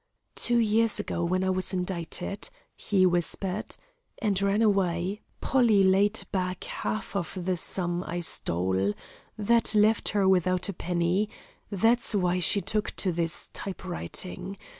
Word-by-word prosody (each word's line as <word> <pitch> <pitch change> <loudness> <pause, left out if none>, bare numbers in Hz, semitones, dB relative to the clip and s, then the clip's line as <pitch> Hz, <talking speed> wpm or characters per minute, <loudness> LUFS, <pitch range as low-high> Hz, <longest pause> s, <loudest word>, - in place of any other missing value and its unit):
"Two 240 - +1
years 225 -1 +3
ago, 175 -4 -2
when 185 +2 0
I 190 - +1
was 185 +1 0
indicted," 180 - -4 0.3
he 190 -3 +2
whispered, 180 +3 -1 0.4
"and 200 -4 0
ran 200 +3 +2
away, 195 -1 +1 0.2
Polly 230 -7 +4
paid 200 +3 +3
back 185 -2 -2
half 215 -1 -4
of 180 -1 -3
the 185 -1 +1
sum 175 0 -2
I 175 +1 -3
stole. 95 - 0 0.4
That 225 +1 +3
left 215 +1 +3
her 200 -2 +2
without 185 0 +2
a - - -2
penny; 180 +4 0 0.4
that's 225 +3 +2
why 180 -2 +1
she 200 +3 +3
took 210 +1 -2
to 190 - 0
this 165 -1 -1
typewriting. 185 0 -4
190 Hz, 140 wpm, -27 LUFS, 175-210 Hz, 0.4 s, Polly